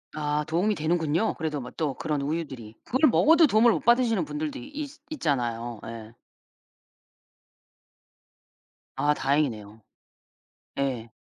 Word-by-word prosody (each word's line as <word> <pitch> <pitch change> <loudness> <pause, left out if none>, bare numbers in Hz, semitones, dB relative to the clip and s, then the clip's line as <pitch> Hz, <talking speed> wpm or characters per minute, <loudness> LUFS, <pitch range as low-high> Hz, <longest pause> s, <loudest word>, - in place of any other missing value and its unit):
아 150 0 -1
도움이 185 +6 +1
되는군요, 160 +4 0
그래도 155 -3 -3
뭐 125 -2 -8
또 150 -5 -1
그런 150 +1 -2
우유들이. 140 -7 -4
그걸 260 +5 +3
먹어도 320 +6 +5
도움을 230 0 +5
못 - - -1
받으시는 235 +1 +3
분들도 295 -1 -4
있 290 +1 -6 0.2
있잖아요. 120 - -2
예. 115 -1 -9 2.8
아 145 +2 +2
다행이네요. 115 -8 -1 1.0
예. 130 -5 -2
150 Hz, 255 characters per minute, -26 LUFS, -, 2.8 s, 먹어도